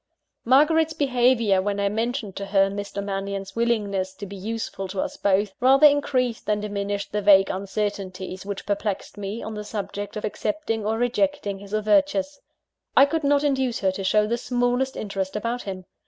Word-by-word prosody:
Margaret's 315 +5 +4
behaviour, 245 -8 +3
when 200 +1 -2
I 200 - +2
mentioned 225 0 -2
to 200 - -4
her 195 0 +3
Mr. 200 0 -5
Mannion's 195 0 -4
willingness 205 -5 0
to 205 - -7
be 200 +1 -9
useful 205 -1 -4
to 185 +1 -5
us - - -2
both, 200 0 +1
rather 270 +4 +6
increased 260 -5 +2
than 210 -1 +1
diminished 205 -1 -3
the 210 - -1
vague 195 -1 +6
uncertainties 190 -1 -4
which 200 0 -6
perplexed 205 -1 -2
me, 205 +2 -5
on 220 - -5
the 210 0 -5
subject 205 0 -5
of 210 - -3
accepting 225 -2 -2
or 220 +1 0
rejecting 245 -4 0
his 200 0 -12
overtures. 285 +7 +1 0.6
I 275 - +9
could 320 +2 -2
not 285 0 +3
induce 265 -4 +1
her 190 -1 +2
to 195 +1 -5
show 210 +3 +3
the 235 +2 -1
smallest 245 +2 0
interest 195 -2 -3
about 230 +3 -2
him. 185 -2 -6
210 Hz, 175 wpm, -24 LUFS, 200-245 Hz, 0.6 s, I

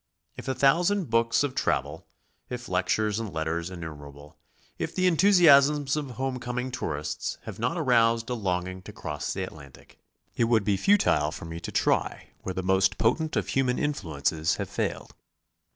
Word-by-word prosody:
If - - -9
a 130 - -1
thousand 170 - +2
books 115 +3 +3
of 140 -2 -2
travel, - - -2 0.4
if 125 0 -6
lectures 100 +3 0
and 110 -3 -5
letters 80 +2 -2
innumerable, 75 -4 -10 0.4
if - - -3
the 185 - +1
enthusiasms 150 -6 +5
of 150 -3 -3
home 130 +1 -3
coming 125 +1 -4
tourists 75 -9 -3
have - - -8
not - - -1
aroused 115 0 +3
a - - +1
longing 95 -4 -2
to 105 - -11
cross 75 -6 -4
the - - -3
Atlantic, 70 -4 -12 0.4
it 120 - +2
would 115 -2 +2
be 100 0 +1
futile 95 - +3
for 80 - -8
me 80 0 -6
to 85 - -7
try - - 0
where 95 - -5
the 95 - -2
most 95 +1 +2
potent 155 +8 +1
of - - -1
human 130 -2 +1
influences 80 - -1
have - - -5
failed. - - -3
115 Hz, 170 wpm, -27 LUFS, 85-135 Hz, 0.4 s, enthusiasms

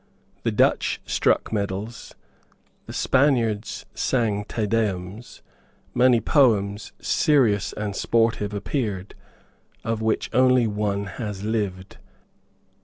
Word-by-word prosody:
The - - 0
Dutch - - +2
struck - - +1
medals. 100 +2 -4 0.7
The - - -7
Spaniards 120 -6 +1
sang 110 -5 0
Te 110 +1 -2
Deums. 105 0 -3 0.5
Many 125 -1 +4
poems, 105 -7 +2
serious 120 - +2
and 105 -2 -4
sportive, 115 -3 +1
appeared, 105 -3 -3 0.7
of 115 -1 -2
which 110 0 -1
one 125 - +4
only 105 -6 +2
has 105 -4 -5
lived. 100 -4 -3
110 Hz, 100 wpm, -24 LUFS, 100-120 Hz, 0.7 s, Many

